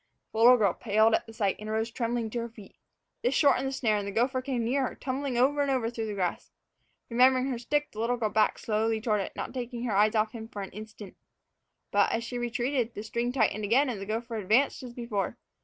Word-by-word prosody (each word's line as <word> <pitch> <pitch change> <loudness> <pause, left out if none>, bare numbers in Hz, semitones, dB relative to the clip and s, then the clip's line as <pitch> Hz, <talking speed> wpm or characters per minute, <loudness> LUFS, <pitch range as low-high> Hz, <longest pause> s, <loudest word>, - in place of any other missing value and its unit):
The 220 - -4
little 245 +2 +8
girl 200 -6 +3
paled 220 +2 +2
at - - +1
the - - -10
sight, 200 -3 0
and 215 0 -7
arose 220 +1 -1
trembling 230 -1 -2
to 240 - -2
her 235 0 -4
feet. 215 -3 -14 0.5
This 250 +3 +1
shortened 270 -2 +3
the - - -2
snare, 225 -5 +1
and 200 -1 -3
the - - -3
gopher 255 +5 +1
came 255 -3 -2
nearer, 260 +2 0
tumbling 265 -1 -3
over 280 +4 +3
and 285 - +1
over 250 -4 0
through 225 -2 -4
the 210 - -4
grass. 180 -3 -2 0.6
Remembering 255 +2 +4
her 240 - -3
stick, 295 +4 -1
the 215 - -9
little 240 +2 0
girl 220 -3 0
backed 215 -1 +2
slowly 220 +1 0
toward 215 -2 0
it, - - -6
not - - -5
taking 245 -2 -5
her 225 -5 -1
eyes 210 +2 +4
off 215 0 +2
him 225 -1 -8
for 205 -3 -6
an 190 - -8
instant. 215 -1 -10 0.8
But, 205 0 +3
as 230 - -1
she 245 +1 -4
retreated, 240 0 -1
the 210 - -5
string 235 +2 -2
tightened 220 -4 +1
again, 255 +7 +3
and 215 -5 -4
the 195 - -6
gopher 230 +1 -3
advanced 220 +7 +2
as 250 -2 -8
before. 235 -5 -3
230 Hz, 240 wpm, -28 LUFS, 215-250 Hz, 0.8 s, little